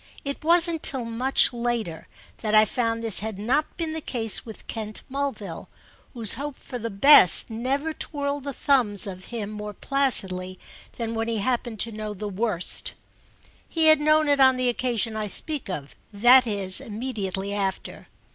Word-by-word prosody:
It 280 +1 -5
wasn't 335 0 +4
till 260 -4 -2
much 245 +3 +2
later 235 -8 -3 0.3
that 215 -1 -1
I 215 0 +7
found 230 0 -2
this 220 -5 +3
had 215 -1 -5
not 250 +9 -1
been 330 -2 -3
the 320 0 -5
case 225 -7 -2
with 220 -2 -11
Kent 215 -1 -5
Mulville, 245 -11 -5 0.5
whose 225 -4 +5
hope 280 +3 -6
for 250 - -8
the 230 0 -4
best 205 - +6
never 270 +7 -2
twirled 285 -2 -4
the 280 - -3
thumbs 240 -8 0
of 185 -2 -8
him 215 -4 -6
more 210 -1 -7
placidly 190 -10 +1 0.4
than 230 -1 -4
when 225 0 -3
he 230 -1 -1
happened 235 0 -2
to 230 - +1
know 215 -1 -6
the 210 +2 -6
worst. 200 -2 -2 0.8
He 325 -1 +1
had 310 -1 +5
known 305 0 +3
it 285 -1 +2
on 260 -1 +5
the 255 -1 0
occasion 235 -2 -1
I 215 -1 -3
speak 290 +4 +1
of—that 215 - +2
is 195 -3 +2
immediately 205 -4 -5
after. 195 -2 -4
230 Hz, 165 wpm, -24 LUFS, 210-275 Hz, 0.8 s, I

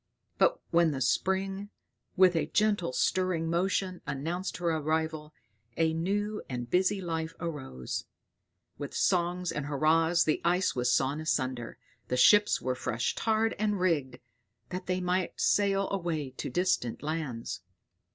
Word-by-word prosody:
But - - +4
when 170 -1 +4
the 140 -3 -3
spring, 190 +8 0 0.5
with 185 -1 +6
a 165 - +1
gentle 205 -7 +1
stirring 175 +4 +1
motion, 185 +1 0
announced 170 +7 -3
her 175 -1 0
arrival, 155 0 -1 0.5
a 160 -1 +2
new 205 +6 -1
and 120 -2 -4
busy 185 +7 +2
life 165 -3 -3
arose; 135 - -5 0.7
with 145 -1 -6
songs 180 -1 +1
and 145 -1 -3
hurrahs 160 +3 +3
the 155 - 0
ice 180 +2 +2
was 125 -1 +1
sawn 140 +4 +1
asunder, 130 -6 -2 0.3
the 125 - -1
ships 205 +10 +6
were 130 - -1
fresh 120 -1 -2
tarred 225 0 +1
and 210 -2 0
rigged, 150 -9 0 0.5
that 180 - -5
they 185 0 0
might 180 0 -1
sail 195 -1 +2
away 165 -8 -2
to 130 - -5
distant 150 -6 0
lands. 150 -7 -4
170 Hz, 140 wpm, -29 LUFS, 145-185 Hz, 0.7 s, with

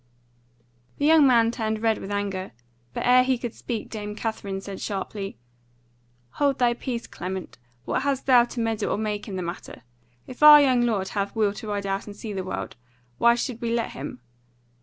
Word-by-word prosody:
The 290 - 0
young 310 -2 +6
man 230 -3 +4
turned 220 -2 -3
red 225 -1 +2
with 195 - -7
anger; 200 -2 -3 0.4
but - - -4
ere 250 +1 +6
he 260 0 +1
could 240 -1 -5
speak 230 -3 -5
Dame 210 -1 -6
Katherine 210 -3 -4
said 195 0 -8
sharply: 195 0 -4 1.0
"Hold 280 -2 +2
thy 245 -1 +3
peace, 240 -1 -4
Clement! 185 -5 -6 0.3
What - - -1
hast 275 -1 -1
thou 245 -3 +6
to 240 - -7
meddle 225 -2 -1
or - - -1
make 210 -1 -3
in 195 - -5
the 185 - -3
matter? 170 +1 -7 0.4
If 255 - -11
our 300 0 +11
young 260 -4 +4
lord 215 -6 0
hath 200 +1 -3
will 210 -2 +2
to 220 +1 -8
ride 205 -1 -3
out 195 +1 -2
and 205 - -8
see 210 0 -6
the 190 -1 -3
world, 185 - -5 0.4
why 235 0 +5
should 240 -1 -4
we 235 - -1
let 235 -1 -1
him? 135 -2 -7
220 Hz, 195 wpm, -25 LUFS, 200-245 Hz, 1.0 s, our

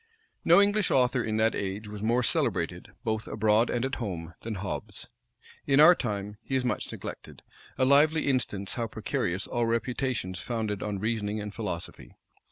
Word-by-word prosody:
No 170 +3 +6
English 205 0 +3
author 125 -1 +2
in 110 -1 -1
that 110 +1 +3
age 100 +2 -4
was 105 -1 -7
more 120 +3 +2
celebrated, - - 0 0.2
both 110 0 -2
abroad 110 +2 +2
and 120 +1 0
at 135 - -4
home, 85 -6 -5
than 115 -1 -4
Hobbes: 95 +1 -6 0.6
in 135 0 +4
our 155 +4 +10
time, 105 - -4
he 135 - -4
is 130 -1 +1
much 125 - -2
neglected; - - -8 0.3
a 130 - +3
lively 150 +4 +4
instance 105 -7 -1
how 115 -2 -2
precarious 100 -4 -2
all 120 -1 -1
reputations 115 -5 -2
founded 110 -1 -3
on 105 -2 -3
reasoning 110 0 -2
and 105 0 -6
philosophy. 105 -7 -5
110 Hz, 170 wpm, -28 LUFS, 105-125 Hz, 0.6 s, our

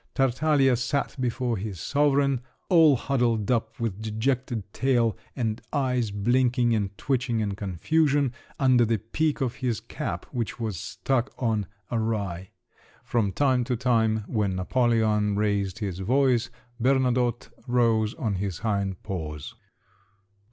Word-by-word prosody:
Tartaglia 135 0 +3
sat 130 +3 -1
before 125 -1 -1
his 95 -2 -5
sovereign, 140 - +2 0.3
all 165 -6 +6
huddled 120 -4 0
up, 115 -2 -1
with 110 -3 -3
dejected 115 +1 -1
tail, 120 -3 +2 0.2
and 115 -4 -2
eyes 125 -5 0
blinking 120 +3 +2
and 100 -2 -1
twitching 125 -2 0
in 105 -2 -1
confusion, 135 - +1 0.2
under 130 -3 +4
the 115 0 +1
peak 145 +10 -1
of 130 -1 -1
his 120 -6 -1
cap - - -5
which 115 -6 -3
was 110 -4 -2
stuck 135 +6 -1
on 110 -6 0 0.2
awry; 100 -6 -2 0.5
from 110 -5 0
time 130 +1 +2
to 125 +1 -1
time 110 -3 +1
when 105 -4 -1
Napoleon 110 0 +1
raised 100 -2 0
his 100 -5 -4
voice, 125 +3 +2 0.3
Bernadotte 125 -2 +1 0.2
rose 115 -3 +2
on 110 -5 -2
his 95 -2 -3
hind 100 -4 -2
paws. 75 -7 -5
115 Hz, 130 wpm, -26 LUFS, 105-130 Hz, 0.5 s, all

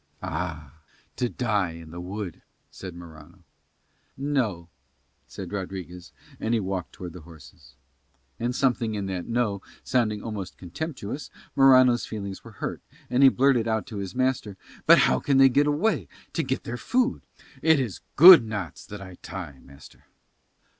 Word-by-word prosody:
"Ah. 80 -3 -5 0.4
To 125 - 0
die 105 -9 -1
in 80 -1 -11
the 85 +1 -7
wood," 95 0 -6 0.3
said 95 -3 -9
Morano. 85 +1 -13 0.7
"No," 125 -12 -1 0.6
said 95 -3 -8
Rodriguez; 90 -3 -6 0.3
and 115 +1 0
he - - +2
walked 95 -3 -4
towards 90 -2 -8
the 90 - -10
horses. 75 -4 -16 0.6
And 120 +1 -1
something 120 -5 +1
in 100 -1 -3
that 95 -2 -4
"No" 115 -5 0 0.2
sounding 110 -5 0
almost 105 -5 -6
contemptuous, 135 - -6 0.3
Morano's 130 -3 +6
feelings 100 -3 -6
were 115 - -12
hurt, - - -5 0.3
and 125 - +2
he 135 - +9
blurted 130 -3 +2
out 110 -1 0
to 115 -6 -8
his 95 -2 -5
master 130 -6 -1 0.3
"But - - +9
how 65 - +4
can 140 - +1
they 135 0 +7
get 145 +3 +3
away 160 +10 +1 0.3
to 165 - 0
get 130 -3 -2
their 120 - -5
food? 250 - 0 0.4
It 160 -2 +4
is 120 -8 -3
good 170 -3 +11
knots 105 -8 -5
that 105 -1 -8
I 95 -2 -11
tie, 85 -9 -8
master." 70 0 -17
105 Hz, 155 wpm, -26 LUFS, 90-130 Hz, 0.7 s, good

